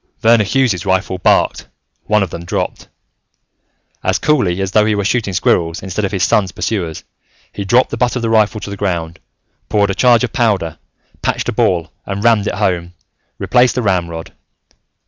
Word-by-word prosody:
Verner 115 Hz, -1 st, +5 dB
Hughes' 105 Hz, -5 st, +1 dB
rifle 95 Hz, -1 st, -1 dB
barked, -, -, +2 dB, 0.4 s
one 105 Hz, -1 st, +2 dB
of 95 Hz, -, -5 dB
them 85 Hz, -, -6 dB
dropped. 85 Hz, -, -4 dB, 1.2 s
As -, -, +1 dB
cooly 100 Hz, -13 st, +1 dB
as 95 Hz, -1 st, -2 dB
though 105 Hz, +1 st, +4 dB
he 110 Hz, -1 st, +1 dB
were 100 Hz, -1 st, -1 dB
shooting 110 Hz, -2 st, 0 dB
squirrels 80 Hz, -1 st, +1 dB
instead 95 Hz, +2 st, -2 dB
of 95 Hz, -, -3 dB
his 95 Hz, -3 st, -1 dB
son's 95 Hz, -4 st, +2 dB
pursuers, 85 Hz, -2 st, -3 dB, 0.5 s
he 100 Hz, -, -4 dB
dropped 120 Hz, +6 st, +3 dB
the -, -, -3 dB
butt 125 Hz, +1 st, +1 dB
of 125 Hz, -, -3 dB
the 115 Hz, -, 0 dB
rifle 110 Hz, -1 st, +2 dB
to 100 Hz, -, -6 dB
the -, -, -4 dB
ground, 85 Hz, -5 st, -3 dB, 0.5 s
poured 100 Hz, -2 st, +2 dB
a -, -, -1 dB
charge 120 Hz, +2 st, +4 dB
of 125 Hz, -, -2 dB
powder, 100 Hz, -, 0 dB, 0.4 s
patched -, -, -1 dB
a -, -, -2 dB
ball 85 Hz, -2 st, 0 dB, 0.2 s
and 100 Hz, +1 st, -4 dB
rammed 115 Hz, -3 st, +3 dB
it -, -, -2 dB
home, 90 Hz, -1 st, -1 dB, 0.4 s
replaced 125 Hz, -2 st, +2 dB
the 125 Hz, -, -1 dB
ramrod. 85 Hz, -5 st, -2 dB
100 Hz, 185 wpm, -16 LUFS, 90-115 Hz, 1.2 s, Verner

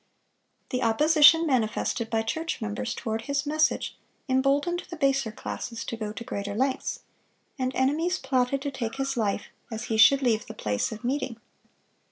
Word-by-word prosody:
The 250 Hz, -, -1 dB
opposition 300 Hz, +7 st, +6 dB
manifested 230 Hz, -3 st, 0 dB
by 225 Hz, -1 st, 0 dB
church 320 Hz, +9 st, -3 dB
members 220 Hz, +2 st, -3 dB
toward 220 Hz, -1 st, -3 dB
his 280 Hz, +1 st, -1 dB
message, 310 Hz, +1 st, +1 dB, 0.3 s
emboldened 280 Hz, +6 st, +1 dB
the 340 Hz, -, -6 dB
baser 275 Hz, -6 st, +1 dB
classes 230 Hz, +2 st, -6 dB
to -, -, -4 dB
go 215 Hz, -2 st, -4 dB
to 215 Hz, +2 st, -7 dB
greater 205 Hz, -4 st, -4 dB
lengths; 265 Hz, +3 st, -1 dB, 0.6 s
and 255 Hz, 0 st, 0 dB
enemies 315 Hz, +7 st, +1 dB
plotted 265 Hz, 0 st, 0 dB
to 285 Hz, -, -2 dB
take 235 Hz, -2 st, -4 dB
his 270 Hz, 0 st, -2 dB
life 205 Hz, -3 st, -1 dB, 0.2 s
as 220 Hz, 0 st, -4 dB
he -, -, +1 dB
should 275 Hz, +5 st, +7 dB
leave 225 Hz, -4 st, +1 dB
the -, -, -8 dB
place 105 Hz, -1 st, -1 dB
of 220 Hz, +2 st, -8 dB
meeting. 255 Hz, -2 st, -2 dB
260 Hz, 165 wpm, -27 LUFS, 225-280 Hz, 0.6 s, should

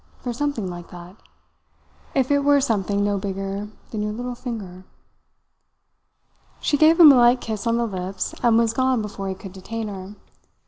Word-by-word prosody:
For 245 Hz, -, -5 dB
something 265 Hz, -6 st, -2 dB
like 175 Hz, -1 st, -8 dB
that. 175 Hz, +1 st, -11 dB, 1.0 s
If 265 Hz, 0 st, +1 dB
it 285 Hz, -, +4 dB
were 285 Hz, 0 st, +4 dB
something 205 Hz, -6 st, 0 dB
no 205 Hz, -1 st, 0 dB
bigger 195 Hz, +1 st, -4 dB, 0.2 s
than 215 Hz, -, -3 dB
your 210 Hz, 0 st, -2 dB
little 245 Hz, +2 st, -4 dB
finger." 210 Hz, -7 st, -7 dB, 1.8 s
She 295 Hz, -, +1 dB
gave 315 Hz, +3 st, +5 dB
him 315 Hz, -4 st, +11 dB
a -, -, +6 dB
light 240 Hz, +1 st, +5 dB
kiss 220 Hz, -2 st, -4 dB
on 230 Hz, 0 st, +2 dB
the 235 Hz, -, +1 dB
lips 190 Hz, -2 st, -4 dB
and 235 Hz, -2 st, +4 dB
was 230 Hz, -1 st, +2 dB
gone 255 Hz, -2 st, +1 dB
before 195 Hz, -2 st, -5 dB
he 190 Hz, -, -3 dB
could 190 Hz, 0 st, -11 dB
detain 220 Hz, +3 st, -5 dB
her. 195 Hz, 0 st, -8 dB
220 Hz, 175 wpm, -23 LUFS, 195-245 Hz, 1.8 s, him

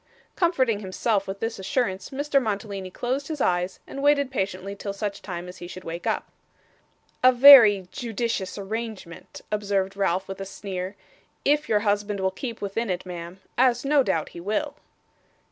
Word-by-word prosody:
Comforting 260 Hz, -, +2 dB
himself 195 Hz, +1 st, -1 dB
with 195 Hz, +1 st, -6 dB
this 225 Hz, -2 st, -3 dB
assurance, 190 Hz, -1 st, -1 dB
Mr. 280 Hz, 0 st, +1 dB
Mantalini 200 Hz, -4 st, -3 dB
closed 255 Hz, +8 st, -3 dB
his 310 Hz, -2 st, -4 dB
eyes 180 Hz, -4 st, 0 dB
and 275 Hz, -, -7 dB
waited 285 Hz, -2 st, +3 dB
patiently 195 Hz, -3 st, -3 dB
till 200 Hz, 0 st, -5 dB
such 205 Hz, 0 st, -4 dB
time 175 Hz, -2 st, -6 dB
as 180 Hz, -, -10 dB
he 175 Hz, -, -8 dB
should 185 Hz, +1 st, -9 dB
wake 165 Hz, +1 st, -6 dB
up. -, -, -1 dB, 1.0 s
'A 255 Hz, -, +8 dB
very 240 Hz, -8 st, +9 dB
judicious 230 Hz, -5 st, -3 dB
arrangement,' 210 Hz, -3 st, -6 dB
observed 200 Hz, -2 st, -1 dB
Ralph 190 Hz, -1 st, 0 dB
with 195 Hz, 0 st, -7 dB
a -, -, -2 dB
sneer, 190 Hz, -1 st, -5 dB, 0.5 s
'if 295 Hz, +1 st, +2 dB
your 210 Hz, -2 st, +3 dB
husband 205 Hz, -1 st, 0 dB
will 190 Hz, 0 st, +1 dB
keep 230 Hz, +4 st, -6 dB
within 205 Hz, +3 st, -2 dB
it, 180 Hz, 0 st, -2 dB
ma'am 175 Hz, +1 st, -8 dB, 0.2 s
as 250 Hz, 0 st, +3 dB
no 290 Hz, 0 st, +4 dB
doubt 190 Hz, -10 st, -1 dB
he -, -, -10 dB
will. 215 Hz, -, -2 dB
205 Hz, 165 wpm, -25 LUFS, 190-245 Hz, 1.0 s, very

